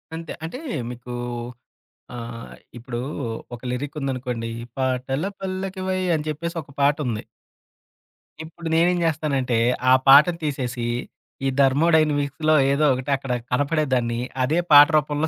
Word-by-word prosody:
అంతే. 165 0 -6
అంటే 170 +11 -5 0.3
మీకూ 125 0 -8 1.0
ఆహ్, 115 0 -8 0.3
ఇప్పుడు 120 0 -6 0.6
ఒక 115 - -15
లిరీకుందనుకోండి 130 -4 -3 0.3
'పాటల 130 +3 -1 0.2
పల్లకివై' 190 0 -3
అని 150 - -3
చెప్పేసి 170 +3 -4
ఒక 140 - -16
పాటుంది. 140 -6 +1 1.2
ఇప్పుడు 165 +1 -9
నేనేం 175 +2 +3
జేస్తానంటే 145 -6 0 0.3
ఆ - - +8
పాటని 150 +5 +7
తీసేసి 125 -5 -2 0.6
ఈ - - +3
థర్మోడైనమిక్స్‌లో 150 +1 +3 0.2
ఏదో 150 +2 +2
ఒకటి 130 +3 -3
అక్కడ 135 -2 -4 0.2
కనపడేదాన్ని 130 -4 0 0.2
అదే 155 +7 +1
పాట 145 0 +10
రూపంలో 150 +1 0
145 Hz, 110 wpm, -23 LUFS, 125-160 Hz, 1.2 s, పాట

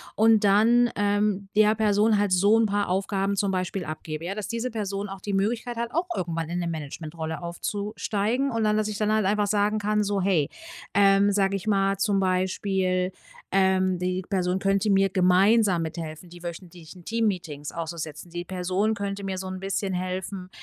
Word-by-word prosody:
und 220 -1 +4
dann, 230 +5 +5
ähm, 205 -1 0
der 215 0 +5
Person 210 0 +3
halt 205 -1 +1
so 200 +4 +4
'n 225 - +3
paar 205 -1 0
Aufgaben 195 +1 0
zum 200 0 0
Beispiel 185 0 -2
abgebe, 155 0 -6
ja? 185 +3 -3
Dass 210 -1 -4
diese 235 +2 -3
Person 200 -2 -3
auch 195 0 -7
die 200 +2 -4
Möglichkeit 230 +5 -1
hat, 235 0 -3
auch 340 +3 0
irgendwann 165 -2 -3
in 175 +1 -2
'ne 175 - -2
Managementrolle 160 +1 -5
aufzusteigen. 210 +7 -2
Und 230 -1 -1
dann, 210 0 +2
dass 215 -1 0
ich 210 -1 -4
dann 215 0 +1
halt 215 -2 +2
einfach 205 +1 +1
sagen 210 +1 +1
kann 210 +1 +1
so: 200 -1 0
„Hey“, 180 -6 +2 0.5
ähm, 200 +1 +5
sage 195 0 +2
ich 195 - -9
mal 195 -1 +2
zum 195 0 +1
Beispiel, 185 0 0 0.4
ähm, 190 -1 +2
die 180 +1 -1
Person 185 -1 0
könnte 195 +2 +1
mir 195 0 +4
gemeinsam 190 +1 +4
mithelfen, 160 +1 -6
die 175 0 -13
wöchentlichen 175 0 -9
Teammeetings 180 -10 -2
auszusetzen. 165 -1 -6
Die 175 0 -4
Person 185 +4 -1
könnte 200 -1 -4
mir 190 -1 -3
so 190 0 -5
'n 185 0 -5
bisschen 195 0 -2
helfen, 185 +1 -4
195 Hz, 185 wpm, -25 LUFS, 180-210 Hz, 0.5 s, dann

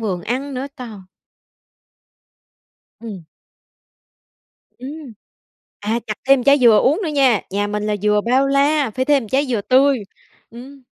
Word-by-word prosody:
vườn 185 -6 -3
ăn 265 +6 -4
nữa, 260 +2 -4
trời! 225 -5 -9 2.0
Ừm. 210 -7 -9 1.5
Ừm. 275 0 -9 0.7
À, 220 +3 -1
chặt 215 - -3
thêm 270 -2 +5
trái 280 +1 +5
dừa 235 -5 +5
uống 300 +9 +2
nữa 345 - -2
nha. 270 -8 +2
Nhà 205 +2 -1
mình 210 0 -3
là 210 - -1
dừa 210 0 +2
bao 255 +5 +1
la, 280 0 +1
phải 255 +5 -2
thêm 285 -2 +2
một 220 - -10
trái 275 +6 0
dừa 235 -5 -1
tươi. 265 +4 +3 0.5
Ừm. 260 +4 -13
255 Hz, 150 wpm, -19 LUFS, 215-275 Hz, 2.0 s, thêm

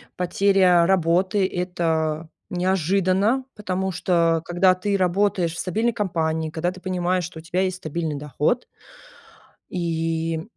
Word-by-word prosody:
потеря 180 -1 +3
работы- 185 +2 +2
это 165 -3 -1 0.2
неожиданно. 190 - +1
Потому 190 -2 -2
что 165 -2 +1
когда 185 +1 +3
ты 200 +2 -1
работаешь 185 -2 +1
в - - -8
стабильной 220 +6 0
компании, 160 -5 -1
когда 175 +2 -1
ты 185 - -12
понимаешь, 185 -1 0
что 165 -1 -7
у - - -9
тебя 180 +3 -1
есть 185 -1 -1
стабильный 160 -2 -3
доход 150 - -1 1.0
и 165 -1 -2
180 Hz, 125 wpm, -23 LUFS, 165-190 Hz, 1.0 s, потеря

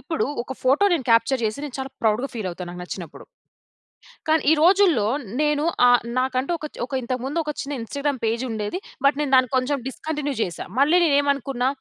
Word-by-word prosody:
ఇప్పుడు 325 - -2 0.2
ఒక 255 - -7
ఫోటో 270 +9 +3
నేను 295 -8 0
క్యాప్చర్ 230 +3 +3
చేసి, 215 +2 -1
నేను 285 -4 -7
చాలా 265 0 -4
ప్రౌడ్‌గా 225 +4 +1
ఫీలవుతా 185 -5 -4
నాకు 180 0 -8
నచ్చినప్పుడు. 180 -2 -8 1.0
కానీ, 315 0 +3
ఈ - - +6
రోజుల్లో 355 - +5 0.4
నేను 295 0 +1 0.2
ఆహ్, 245 -1 +5 0.2
నాకంటూ 260 +3 0
ఒక 305 - -5 0.2
ఒక - - -19
ఇంతకు 250 +1 -3
ముందు 290 +5 -2
ఒక 300 - -2
చిన్న 280 -1 -4
ఇన్‌స్టాగ్రామ్ 280 +3 -2
పేజుండేది. 225 - -2 0.3
బట్, 280 - +4
నేను 290 -2 -1
దాన్ని 255 -2 +3
కొంచెం 270 +3 +1
డిస్కంటిన్యూ 290 +1 -4
చేశా. 170 -2 -4 0.2
మళ్ళీ 315 +6 +5
నేనేం 285 -2 +3
అనుకున్నా, 260 -1 -2
265 Hz, 180 wpm, -23 LUFS, 230-295 Hz, 1.0 s, ఈ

